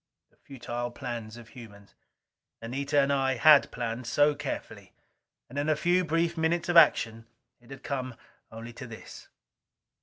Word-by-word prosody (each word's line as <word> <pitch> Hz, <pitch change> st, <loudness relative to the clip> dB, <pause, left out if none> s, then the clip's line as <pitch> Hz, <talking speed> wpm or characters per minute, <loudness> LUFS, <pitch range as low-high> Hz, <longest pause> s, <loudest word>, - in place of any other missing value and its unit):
The -, -, -33 dB
futile 120 Hz, -2 st, -6 dB
plans 120 Hz, -3 st, -7 dB
of 115 Hz, -1 st, -13 dB
humans! 105 Hz, -5 st, -14 dB, 0.7 s
Anita 140 Hz, +5 st, -1 dB
and 140 Hz, +1 st, +1 dB
I 135 Hz, -1 st, +1 dB
had 150 Hz, +3 st, +6 dB
planned 120 Hz, 0 st, -5 dB
so 145 Hz, +4 st, +3 dB
carefully. 145 Hz, -1 st, -7 dB, 0.5 s
And 140 Hz, +4 st, -6 dB
in 145 Hz, +2 st, -1 dB
a 155 Hz, -, +3 dB
few 175 Hz, +4 st, +1 dB
brief 165 Hz, +1 st, 0 dB
minutes 170 Hz, +2 st, -1 dB
of 175 Hz, -, 0 dB
action 115 Hz, -8 st, +4 dB, 0.3 s
it 120 Hz, 0 st, -22 dB
had 135 Hz, -1 st, -11 dB
come 130 Hz, -3 st, -4 dB, 0.4 s
only 115 Hz, +2 st, -9 dB
to 125 Hz, +1 st, -9 dB
this! 115 Hz, -1 st, -12 dB
130 Hz, 155 wpm, -28 LUFS, 120-150 Hz, 0.7 s, had